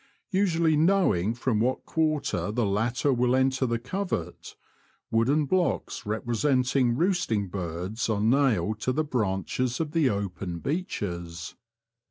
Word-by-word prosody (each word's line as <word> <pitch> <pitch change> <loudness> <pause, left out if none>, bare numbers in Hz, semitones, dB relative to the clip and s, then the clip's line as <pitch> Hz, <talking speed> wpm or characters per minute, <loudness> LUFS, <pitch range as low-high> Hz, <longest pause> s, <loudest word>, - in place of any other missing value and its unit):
Usually 170 -5 +2
knowing 150 - +2
from 120 -2 0
what 125 +4 0
quarter 155 -8 0
the 120 +1 0
latter 115 +7 +1
will 125 0 +2
enter 130 0 +2
the 115 0 0
covert, 125 - -4 0.6
wooden 135 +7 +2
blocks 175 - -1
representing 125 +3 +1
roosting 165 - 0
birds 90 +5 -3
are 105 -2 +1
nailed 110 -4 +2
to 130 - 0
the 155 - +1
branches 120 0 -1
of 160 -2 -2
the 155 -4 +3
open 95 -4 -3
beeches. 85 - -4
125 Hz, 125 wpm, -27 LUFS, 105-150 Hz, 0.6 s, the